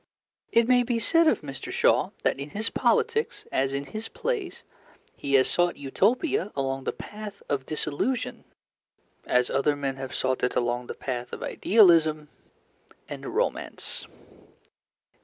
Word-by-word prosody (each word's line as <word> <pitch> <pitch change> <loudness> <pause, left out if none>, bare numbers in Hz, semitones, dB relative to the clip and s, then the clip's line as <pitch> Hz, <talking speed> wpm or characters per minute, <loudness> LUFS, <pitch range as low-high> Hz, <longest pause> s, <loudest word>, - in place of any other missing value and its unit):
It 230 0 +4
may 250 0 +5
be 240 -1 0
said 330 +8 +3
of 245 - +3
Mr. 135 -3 -6
Shaw - - +3
that - - +1
in 140 +2 -5
his 215 +7 -3
politics, 450 +1 +1
as 135 0 +1
in 140 +1 -3
his 215 +9 -6
plays, 430 -6 -3 0.5
he 140 0 0
has 130 - +5
sought 175 0 +1
Utopia 200 - +1
along 135 -1 -2
the - - 0
path 210 -1 -9
of 135 -2 -2
disillusion 230 - -2 0.8
as 125 0 +2
other 145 +1 +2
men 135 -2 -3
have 135 -1 -6
sought 130 0 0
it 125 - +1
along 120 0 0
the - - -6
path 125 -2 -4
of - - -6
idealism 165 -7 +4 0.8
and - - -7
romance. - - -2
150 Hz, 145 wpm, -26 LUFS, 135-225 Hz, 0.8 s, may